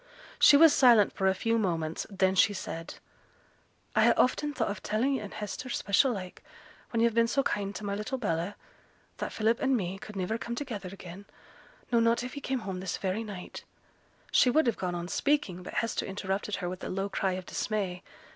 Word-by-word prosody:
She 285 - +8
was 320 0 +7
silent 235 -6 +6
for 190 - 0
a 190 - +3
few 230 +3 +1
moments, 165 -5 -2
then 190 -2 +2
she 200 +2 +4
said, 165 -3 -6 1.0
'I - - +5
ha' - - +5
often 295 +4 +2
thought 250 -7 -1
of 200 - -6
telling 235 +7 0
yo' 265 - -2
and 205 - -8
Hester, 215 +5 -6
special 240 +3 +2
like, 185 -5 -6 0.5
when 230 - 0
yo've 235 -1 +3
been 230 0 +3
so 275 +4 +1
kind 200 -3 -2
to - - -6
my 200 - -2
little 210 +6 -3
Bella, 180 -4 -2 0.6
that - - -4
Philip 225 +2 +1
an' 270 -1 +2
me 190 -3 -3
could 210 - -10
niver 195 +4 -2
come 235 +1 -4
together 230 -8 -5
again; 190 0 -10 0.7
no, 235 - +4
not 230 +1 +2
if 250 - -6
he 285 - -6
came 260 -1 -2
home 190 -3 -5
this 185 0 -3
very 195 +3 -2
night 200 -4 -8 0.3
' - - -36 0.3
She 255 - +5
would 310 +4 +3
have 235 -3 +1
gone 180 -1 -2
on 175 0 -4
speaking, 240 -7 0
but 180 - -9
Hester 230 -1 -1
interrupted 195 +1 -3
her 175 - -4
with 180 +1 -6
a - - -4
low 195 +1 -2
cry 195 -1 -1
of 185 0 -5
dismay. 190 -4 -2
205 Hz, 210 wpm, -29 LUFS, 190-235 Hz, 1.0 s, She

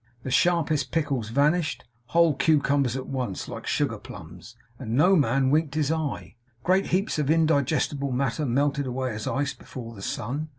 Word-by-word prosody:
The 130 - -4
sharpest 155 -3 +2
pickles 140 -8 -1
vanished, 150 +6 +1 0.2
whole 165 +5 +3
cucumbers 140 -4 +2
at 130 -1 -4
once, 125 -8 -4
like - - -7
sugar - - 0
plums, - - -11 0.2
and 115 -3 -3
no 180 +6 +5
man 135 -3 +2
winked 155 -1 +1
his 155 -1 +1
eye. 155 -6 -3 0.3
Great 190 +2 +2
heaps 185 -2 0
of 145 -2 0
indigestible 145 -3 +1
matter 135 +3 -1
melted 140 +2 +1
away 130 -1 -2
as 105 -1 -5
ice 140 0 -1
before 115 -3 -9
the 100 - -11
sun. 140 +10 -4
140 Hz, 165 wpm, -26 LUFS, 130-155 Hz, 0.3 s, no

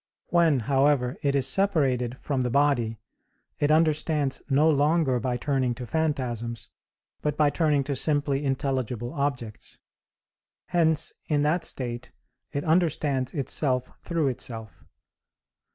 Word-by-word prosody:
When, 165 -6 +3
however, 135 0 +2
it 140 -1 +1
is 135 - +3
separated 135 -11 +1
from 135 -3 -1
the 125 - 0
body, 120 -4 +1 0.6
it 145 - +2
understands 155 -2 +1
no 145 +3 +4
longer 150 -3 +2
by 125 +1 -1
turning 130 -2 0
to 125 0 -7
phantasms, 120 -5 -2 0.5
but 150 -1 -1
by 150 -1 +3
turning 150 -4 +2
to 140 +1 -3
simply 145 0 +1
intelligible 130 -3 -2
objects; 135 -7 -4 0.9
hence 160 -2 +2
in 145 -2 +1
that 165 +3 +1
state 120 -2 -4 0.4
it 140 -1 -3
understands 155 -5 +1
itself 130 -2 0
through 165 -5 0
itself. 115 - -6
140 Hz, 120 wpm, -26 LUFS, 125-150 Hz, 0.9 s, no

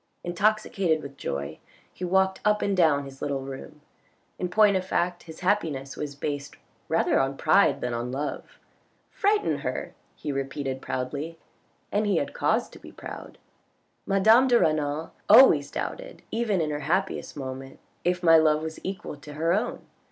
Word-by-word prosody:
Intoxicated 185 -3 +1
with 140 -1 -9
joy 70 - -4 0.3
he - - -9
walked 190 +1 +2
up 210 0 +2
and 200 - +1
down 155 -6 +3
his 135 0 -12
little 140 -2 -2
room. 135 +3 -9 0.6
In 180 - -2
point 210 +1 +5
of 185 - 0
fact 180 -1 -1
his 160 - -10
happiness 155 -8 0
was 145 -1 -5
based 145 0 -4 0.3
rather - - +2
on 135 +1 0
pride 200 - +3
than 125 -1 -2
on 120 +1 -3
love. 145 +3 -5 0.3
" - - -41
Frighten 415 -1 +2
her! - - -4
" - - -39
he 150 - -4
repeated 135 -1 -3
proudly, 140 +7 -4 0.5
and 210 +1 +1
he 205 - +2
had - - -2
cause - - +1
to - - -14
be - - -12
proud. - - -9 0.4
" - - -44
Madame 220 +6 +6
de 240 -2 +5
Renal 155 0 0 0.2
always 185 - +7
doubted - - -6
even 220 -5 0
in 155 -1 -1
her 145 - -2
happiest 175 +3 -1
moments 135 -1 -7 0.2
if 180 +1 0
my 165 -1 +7
love 155 -1 +3
was 160 0 -6
equal 190 -5 -5
to 145 +1 -11
her 165 +3 +1
own. 215 +5 -2
160 Hz, 175 wpm, -26 LUFS, 140-190 Hz, 0.6 s, always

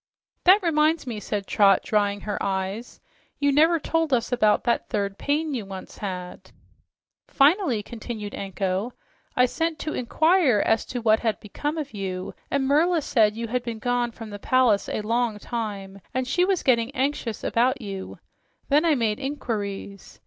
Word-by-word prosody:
"That 380 +3 +7
reminds 315 -1 +2
me," 230 -4 -4
said 205 -1 -3
Trot, 195 -1 +4
drying 205 -2 0
her 210 - -4
eyes, 195 +4 -3 0.4
"you 285 0 +2
never 320 +4 +4
told 325 0 0
us 245 -2 +1
about 215 -4 +3
that 235 - 0
third 200 -1 -2
pain 300 +1 0
you 240 -5 -2
once 195 -1 -9
had." 180 -3 -6 0.8
"Finally," 280 - +3
continued 220 -2 -7
Anko, 195 +3 -3 0.4
"I 250 - +5
sent 325 +5 -1
to 310 -2 -4
inquire 315 - +3
as 225 - +2
to 245 -2 -5
what 220 -1 +4
had 225 -2 -1
become 295 +9 -4
of 290 -4 -5
you, 185 -2 -4 0.2
and 280 -1 0
Merla 315 +4 +3
said 215 -6 +3
you 230 -1 -4
had 250 +2 0
been 235 -2 -5
gone 245 +1 0
from 225 -1 -10
the 205 - -7
palace 245 -3 +2
a - - -2
long 230 0 0
time 200 -4 -5
and 260 -1 0
she 355 +7 +2
was 380 -2 0
getting 235 -2 +3
anxious 260 -5 -2
about 255 +3 +1
you. 195 -4 -7 0.5
Then 295 +2 +4
I 320 -3 +4
made 220 -4 0
inquiries. 205 -8 -5
235 Hz, 170 wpm, -25 LUFS, 205-285 Hz, 0.8 s, That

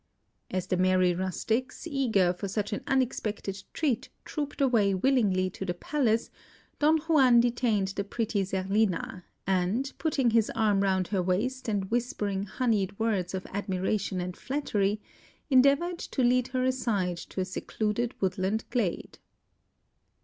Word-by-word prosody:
As 185 -1 -2
the 185 - 0
merry 185 -1 +3
rustics, 220 - -2
eager 235 - +2
for 200 +3 -5
such 205 +2 -2
an - - -3
unexpected 220 -7 -1
treat, 280 -8 -1 0.2
trooped 295 -1 -4
away 225 -8 +3
willingly 195 -5 +2
to 195 - -6
the 175 -2 -2
palace, 230 +1 0 0.5
Don 310 +2 +5
Juan 275 -7 +5
detained 235 -5 +1
the 200 +1 -3
pretty 210 0 -1
Zerlina, 190 -1 -1 0.2
and 195 +9 0
putting 275 -7 +1
his 225 -1 +3
arm 210 -3 +2
round 190 -2 +1
her 195 -3 +1
waist 230 +8 -1
and 200 -2 -2
whispering 210 -5 -1
honeyed 205 -3 0
words 200 -5 0
of 185 - -5
admiration 195 0 -1
and 180 0 -4
flattery, 215 -7 -1 0.5
endeavoured 280 +7 +4
to 260 - -2
lead 250 0 +3
her 255 0 -1
aside 210 -9 0
to 190 - -7
a 185 - +1
secluded 215 +5 -2
woodland 190 +3 0
glade. 220 -9 -2
210 Hz, 140 wpm, -28 LUFS, 190-250 Hz, 0.5 s, Don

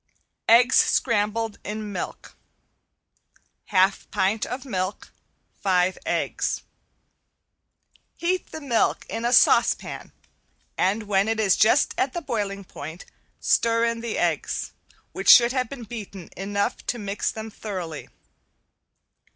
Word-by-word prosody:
~EGGS 240 +2 +6
SCRAMBLED 225 -1 +1
IN 210 0 -5
MILK~ 185 - -6 1.3
Half 190 -1 +2
pint 200 +3 0
of 260 +2 -6
milk, 185 -5 -4 0.5
five 185 -1 +2
eggs. - - -1 1.5
Heat 360 +2 -1
the 315 - -7
milk 245 -6 +1
in 230 - -3
a 240 - +1
saucepan - - +3 0.6
and 200 +4 +1
when 200 -1 +1
it 225 0 -1
is 200 -4 +3
just 225 +6 +3
at 260 - 0
the 345 - -3
boiling 200 -5 -3
point 160 -1 -9 0.3
stir 230 0 +2
in 230 0 -1
the 235 -2 -3
eggs, - - -1 0.4
which - - -1
should 235 0 +9
have 255 -3 -1
been 270 -4 -8
beaten 205 -5 -9
enough 200 +2 -2
to 245 - -1
mix 205 -2 -2
them 220 0 -7
thoroughly. 185 -8 -6
215 Hz, 120 wpm, -24 LUFS, 195-235 Hz, 1.5 s, should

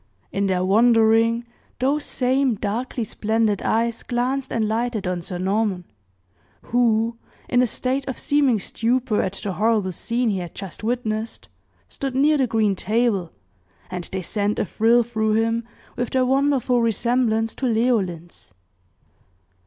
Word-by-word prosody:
In 200 0 0
their 185 -1 +1
wandering, 225 +2 +4 0.3
those 280 +4 +1
same 260 -1 +1
darkly 230 +4 -3
splendid 220 -1 0
eyes 230 +1 0
glanced 255 +2 -2
and 225 -2 0
lighted 225 -1 -1
on 180 -1 -2
Sir 175 +1 -5
Norman, 195 0 0 0.8
who, 230 -1 +1 0.3
in 245 - +3
a 250 - +3
state 260 +4 -2
of 265 - -4
seeming 280 -5 +2
stupor 230 +3 0
at 185 - -2
the 200 0 -4
horrible 210 -1 +1
scene 235 +6 -1
he 195 - -1
had 175 -2 -7
just 195 0 -8
witnessed, 225 -1 -3 0.4
stood 270 -2 -5
near 295 +2 +3
the 260 - +2
green 215 -3 +1
table, 210 -3 0 0.6
and 180 -1 -4
they 190 -1 -5
sent 205 +2 -1
a - - 0
thrill 230 +5 +3
through 220 -2 -1
him 225 +1 +1 0.3
with 245 -1 -2
their 260 -1 +2
wonderful 265 -2 +2
resemblance 225 0 +1
to 265 - -2
Leoline's. 195 - -1
225 Hz, 145 wpm, -22 LUFS, 205-245 Hz, 0.8 s, wandering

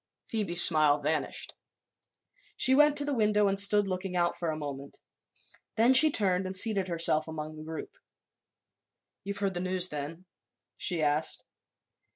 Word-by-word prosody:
Phoebe's 195 -6 +3
smile 155 -3 +5
vanished. 150 +2 -3 1.0
She 260 - +3
went 295 +1 +3
to 290 - +2
the 290 - -3
window 210 -3 +1
and 195 0 -1
stood 205 0 +2
looking 185 -1 -5
out 175 0 -1
for 170 - -5
a 155 - -4
moment. 140 -2 -9 0.8
Then 235 +4 +3
she 310 +4 +7
turned 190 -7 -1
and 190 0 -3
seated 200 -2 +1
herself 165 -2 +2
among 155 -1 -8
the 155 - -11
group. 160 - -9 1.3
"You've 200 +1 -6
heard 195 -1 -3
the 175 - -5
news, 185 0 0
then?" 150 +5 -8 0.5
she 175 -3 -3
asked. 150 +1 -2
180 Hz, 155 wpm, -27 LUFS, 155-205 Hz, 1.3 s, she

